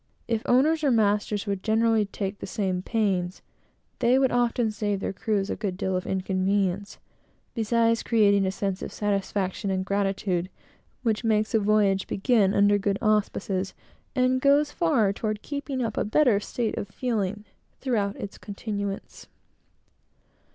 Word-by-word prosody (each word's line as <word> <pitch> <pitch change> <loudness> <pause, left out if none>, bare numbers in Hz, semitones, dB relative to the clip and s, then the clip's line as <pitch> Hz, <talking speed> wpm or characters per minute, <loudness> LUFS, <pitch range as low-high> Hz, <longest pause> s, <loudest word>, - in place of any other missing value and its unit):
If 230 -2 0
owners 305 +6 +3
or 285 - +3
masters 210 -2 +1
would 200 -2 -2
more - - -32
generally 225 -1 +2
take 195 0 -4
the - - -6
same 185 -3 -1
pains, 190 -4 -1 0.6
they 245 +1 +4
would 265 -1 +3
often 240 -2 +1
save 205 -2 -2
their 195 - -3
crews 200 0 -1
a - - -1
good 195 -4 -3
deal 190 0 -1
of 185 - -3
inconvenience, 190 +1 -1 0.6
beside 230 0 +1
creating 200 -4 +3
a - - 0
sense 195 -1 -3
of - - -5
satisfaction 200 -1 -2
and 190 -1 -1
gratitude, 195 -2 -1 0.5
which 225 -1 0
makes 215 0 +1
a 225 - +4
voyage 205 -2 +2
begin 205 -2 +2
under 205 0 +4
good 200 0 0
auspices, 200 -3 0 0.4
and 255 0 +2
goes 285 +2 +4
far 265 - +2
toward 215 0 -3
keeping 280 -3 -3
up 220 -2 -3
a - - +2
better 225 -1 +3
state 225 +2 -3
of - - -5
feeling 210 -2 -2 0.3
throughout 210 -7 -1
its 200 - -8
continuance. 200 -1 -5
210 Hz, 150 wpm, -26 LUFS, 195-230 Hz, 0.6 s, they